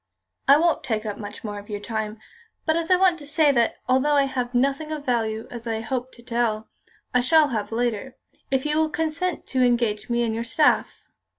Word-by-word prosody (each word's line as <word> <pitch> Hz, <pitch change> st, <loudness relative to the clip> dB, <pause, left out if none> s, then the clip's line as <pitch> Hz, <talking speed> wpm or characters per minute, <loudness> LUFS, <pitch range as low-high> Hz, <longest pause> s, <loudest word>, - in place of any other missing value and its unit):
"I 280 Hz, +1 st, +8 dB
won't 335 Hz, +1 st, +2 dB
take 220 Hz, -4 st, -2 dB
up 210 Hz, -1 st, -4 dB
much 210 Hz, 0 st, -8 dB
more 205 Hz, -2 st, -5 dB
of 205 Hz, -, -14 dB
your 205 Hz, -1 st, -3 dB
time. 220 Hz, 0 st, -4 dB, 0.5 s
But 315 Hz, -, +2 dB
I 335 Hz, +2 st, +3 dB
want 365 Hz, -2 st, +3 dB
to 290 Hz, -, -10 dB
say 305 Hz, 0 st, +3 dB
that, 235 Hz, -4 st, +2 dB
although 265 Hz, +3 st, +3 dB
I 280 Hz, -, +5 dB
have 250 Hz, -2 st, -3 dB
nothing 275 Hz, +5 st, +1 dB
of 300 Hz, -2 st, -5 dB
value, 225 Hz, -3 st, -1 dB
as 235 Hz, -1 st, -7 dB
I 225 Hz, -1 st, -2 dB
hoped, 255 Hz, +2 st, -4 dB
to 235 Hz, -, -16 dB
tell, 230 Hz, -3 st, -1 dB, 0.5 s
I 250 Hz, -, +4 dB
shall 310 Hz, +3 st, +4 dB
have 220 Hz, -4 st, -3 dB
later, 240 Hz, +2 st, -2 dB, 0.3 s
if 265 Hz, 0 st, 0 dB
you 300 Hz, +1 st, +1 dB
will 315 Hz, 0 st, +2 dB
consent 320 Hz, +3 st, -2 dB
to 260 Hz, -, +1 dB
engage 235 Hz, -4 st, +1 dB
me 240 Hz, 0 st, +1 dB
on 225 Hz, -, -1 dB
your 230 Hz, +1 st, -2 dB
staff." 290 Hz, +6 st, +1 dB
245 Hz, 210 wpm, -24 LUFS, 225-295 Hz, 0.5 s, I